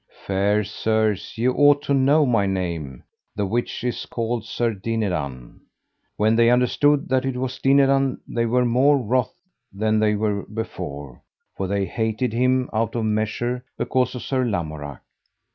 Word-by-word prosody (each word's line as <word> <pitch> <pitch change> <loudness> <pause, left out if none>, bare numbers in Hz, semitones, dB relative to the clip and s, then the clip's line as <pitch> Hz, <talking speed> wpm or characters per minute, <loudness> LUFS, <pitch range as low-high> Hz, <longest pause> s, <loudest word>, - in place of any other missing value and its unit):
Fair 100 +2 +1
sirs, 110 0 -1
ye 115 +3 +1
ought 145 +2 +4
to 140 - 0
know 140 +3 +4
my 115 -6 +2
name, 85 -9 -3 0.3
the 105 - -1
which 120 +4 -2
is 125 -1 -3
called 115 -1 -2
Sir 115 +1 -1
Dinadan. 90 - -3 0.6
When 110 +2 +3
they 115 0 +5
understood 140 +4 +2
that 130 0 +2
it 135 -1 -2
was 130 0 -4
Dinadan 135 -1 +3
they 115 0 -1
were 125 +2 +2
more 130 +5 +4
wroth 130 +7 -1 0.3
than 110 +2 0
they 105 -1 +2
were 105 -1 -1
before, 70 - -6 0.3
for 95 - -3
they 100 0 0
hated 110 +4 -2
him 125 +2 +2
out 115 +1 -1
of 115 -2 -1
measure 110 +3 -1
because 125 0 0
of 125 - -6
Sir 130 -2 0
Lamorak. 80 - -4
115 Hz, 155 wpm, -22 LUFS, 100-125 Hz, 0.6 s, they